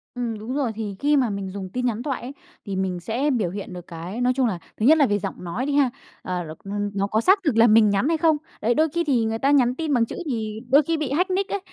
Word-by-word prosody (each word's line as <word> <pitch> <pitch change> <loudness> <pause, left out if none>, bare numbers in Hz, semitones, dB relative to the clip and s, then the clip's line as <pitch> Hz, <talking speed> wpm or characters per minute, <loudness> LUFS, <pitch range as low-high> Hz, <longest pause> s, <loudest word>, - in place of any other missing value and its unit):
Ừm, 235 -3 -3
đúng 230 +5 -5
rồi, 275 -5 0
thì 210 -3 -4
khi 290 +1 +3
mà 255 -4 +2
mình 200 -2 -4
dùng 190 -1 -6
tin 250 0 -1
nhắn 235 -1 -1
thoại 270 -3 -3
ấy, 245 - -6 0.3
thì 200 -2 -4
mình 190 -2 -2
sẽ 235 +10 -1
biểu 225 -9 0
hiện 195 +1 -7
được 180 -1 -9
cái, 175 +7 -6
nói 250 +1 +3
chung 260 -2 +2
là, 190 -6 -2 0.2
thứ 215 - 0
nhất 315 +5 +7
là 290 - +5
về 205 -4 0
giọng 195 -2 -6
nói 195 +9 -3
đi 285 - -1
ha, 280 -3 +4 0.3
ờ, 180 -1 -3 0.2
r - - -14
n 205 0 -2
nó 200 0 0
có 215 +2 +1
xác 385 - +5
thực 285 -9 +1
là 230 +1 +7
mình 215 -1 +6
nhắn 200 +6 +1
hay 330 0 +2
không. 315 -1 +3 0.2
Đấy, 230 +3 +2
đôi 315 +5 +2
khi 340 +3 -1
thì 255 -8 +1
người 225 0 -2
ta 275 +3 +2
nhắn 255 -3 +3
tin 310 0 -2
bằng 235 -3 +3
chữ - - -8
thì 220 -6 -3
đôi 280 +4 +6
khi 330 +3 -1
bị 300 -4 -3
hack 360 +7 +1
nick 380 +1 0
ấy, 405 - -1
235 Hz, 300 wpm, -23 LUFS, 205-285 Hz, 0.3 s, nhất